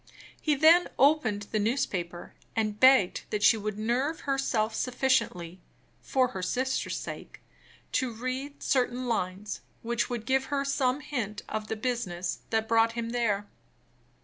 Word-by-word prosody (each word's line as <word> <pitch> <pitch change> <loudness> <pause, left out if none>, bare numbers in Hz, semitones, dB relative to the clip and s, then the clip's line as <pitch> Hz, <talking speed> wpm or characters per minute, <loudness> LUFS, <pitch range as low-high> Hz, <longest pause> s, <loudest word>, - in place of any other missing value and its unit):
He 300 -2 +2
then 325 +5 +6
opened 260 -8 +3
the 215 - +1
newspaper, 200 -7 -2 0.2
and 215 -1 -1
begged 260 -8 +5
that 210 -1 -2
she - - +7
would 215 -1 -4
nerve 250 +8 -1
herself 255 -6 0
sufficiently 220 -9 0 0.4
(for 255 -2 +1
her 190 - -5
sister's 260 +8 -1
sake) - - -8 0.5
to 260 -3 0
read 255 +5 -5
certain 250 -1 +1
lines, 200 -2 -2 0.2
which 235 0 -1
would 240 -3 -4
give 265 +1 +2
her 280 0 -1
some 275 0 +1
hint 230 -9 -4
of 215 0 -4
the 220 - -2
business 215 -7 -2
that 220 -1 0
brought 230 0 +3
him 230 0 -3
there. 215 -4 0
235 Hz, 145 wpm, -28 LUFS, 210-265 Hz, 0.5 s, she